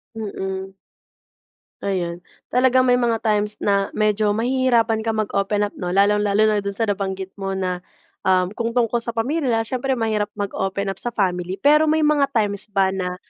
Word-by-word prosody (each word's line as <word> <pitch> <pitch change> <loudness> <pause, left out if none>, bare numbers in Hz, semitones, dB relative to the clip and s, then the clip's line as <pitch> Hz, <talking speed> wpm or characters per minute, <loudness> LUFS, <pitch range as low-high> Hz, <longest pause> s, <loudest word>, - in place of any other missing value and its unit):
Mm. 190 -3 -5 1.1
Ayan. 175 -3 -2 0.3
Talagang 255 +1 +4
may 250 -1 +3
mga 235 -2 0
times 210 -1 +1
na 200 -1 +2
medyo 210 -1 +2
mahihirapan 235 -1 +2
kang 220 0 -2
mag-open 205 0 0
up, 205 - -2
'no? 180 +1 -2
Lalong 205 +1 +4
lalo 200 +1 +2
na 215 -1 +3
do'n 200 0 -4
sa 225 - -1
nabanggit 190 -2 -2
mo 195 0 -3
na, 185 -1 -2 0.5
um, 185 0 +3
kung 230 +2 -3
tungkol 240 -1 +2
sa 235 0 -5
pamilya 245 -1 0
siyempre 255 +3 -1
mahirap 220 -3 0
mag-open 200 -1 -2
up 195 - -9
sa - - -4
family. 185 -5 -1
Pero 300 +7 +4
may 315 0 +2
mga 295 -2 +3
times 205 -2 0
ba 195 -2 +1
na, 180 -1 -3
210 Hz, 170 wpm, -21 LUFS, 195-235 Hz, 1.1 s, Talagang